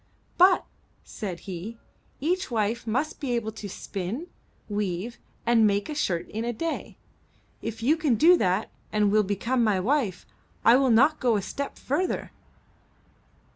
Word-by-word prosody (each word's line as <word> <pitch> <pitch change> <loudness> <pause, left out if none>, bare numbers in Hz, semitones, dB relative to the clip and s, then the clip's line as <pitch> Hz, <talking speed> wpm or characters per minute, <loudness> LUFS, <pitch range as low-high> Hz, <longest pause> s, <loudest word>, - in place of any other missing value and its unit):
But,*' 370 +1 +5 0.4
said 185 -5 -6
he, 195 +4 -7 0.4
each 360 +6 0
wife 225 0 -1
must 260 +8 -1
be 265 -4 -2
able 225 -2 -1
to 210 -2 -8
spin, 195 - -5 0.4
weave, 205 +2 -3 0.3
and 230 -2 +5
make 200 +3 0
a - - -2
shirt 180 - -1
in 220 +2 -3
a 240 - -1
day. 325 +8 -4 0.6
If 225 0 -5
you 290 +6 +4
can 305 -7 +1
do 330 +11 +7
that 185 - 0 0.2
and 210 -1 +2
will 215 +1 +5
become 220 +5 0
my 210 -4 +2
wife, 215 -3 0 0.4
I 230 - +8
will 265 0 +3
not 275 +7 +5
go 240 -3 +2
a 205 - +1
step 280 +7 -5
farther." 355 +8 -2
230 Hz, 155 wpm, -26 LUFS, 205-275 Hz, 0.6 s, I